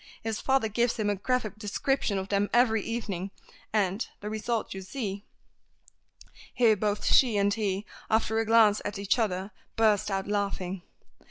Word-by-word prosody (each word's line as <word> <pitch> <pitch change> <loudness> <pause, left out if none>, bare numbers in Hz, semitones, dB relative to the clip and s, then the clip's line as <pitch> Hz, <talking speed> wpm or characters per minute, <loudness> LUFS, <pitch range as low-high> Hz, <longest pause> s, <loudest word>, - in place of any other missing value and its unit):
His 220 -1 -3
father 265 -4 +2
gives 235 +3 +1
him 210 -3 0
a - - 0
graphic 215 0 -2
description 215 +1 -1
of 190 0 -4
them 205 0 +1
every 230 -2 +4
evening, 200 -5 -4 0.4
and 200 0 0
the 210 +1 -6
result 220 +1 -2
you 190 - -6
see." 200 0 -5 1.3
Here 230 -3 +5
both 205 0 -1
she 240 -6 +5
and 200 0 +2
he, 205 -2 -2 0.2
after 220 0 +2
a 225 - 0
glance 220 -2 +5
at 205 - -4
each 200 +5 +1
other, 195 -2 -1 0.2
burst 215 -3 +3
out 195 -1 -2
laughing. 195 -3 -2
210 Hz, 160 wpm, -28 LUFS, 200-225 Hz, 1.3 s, Here